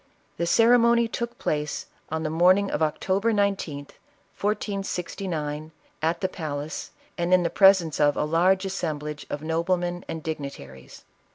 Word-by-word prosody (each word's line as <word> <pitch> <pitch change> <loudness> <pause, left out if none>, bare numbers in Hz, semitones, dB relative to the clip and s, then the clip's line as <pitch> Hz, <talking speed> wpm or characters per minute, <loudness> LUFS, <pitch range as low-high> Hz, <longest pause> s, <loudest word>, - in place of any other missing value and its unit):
The 170 - -1
ceremony 235 +3 +5
took 235 +1 -4
place 150 0 -2 0.2
on 160 0 -2
the 155 - -2
morning 185 +5 +4
of - - -2
October 190 +8 +1
19th, 195 -9 -1 0.4
1469, 180 -7 -3 0.3
at 165 +2 0
the 190 - +2
palace, 155 -4 -5 0.3
and 170 +1 0
in 180 -2 +4
presence 190 -5 +5
of 145 -1 +3
a - - +1
large 180 +5 +2
assemblage 150 -6 -4
of 145 - -4
noblemen 175 +2 -1
and 160 -1 -5
dignitaries. 140 - -7
170 Hz, 130 wpm, -25 LUFS, 155-195 Hz, 0.4 s, ceremony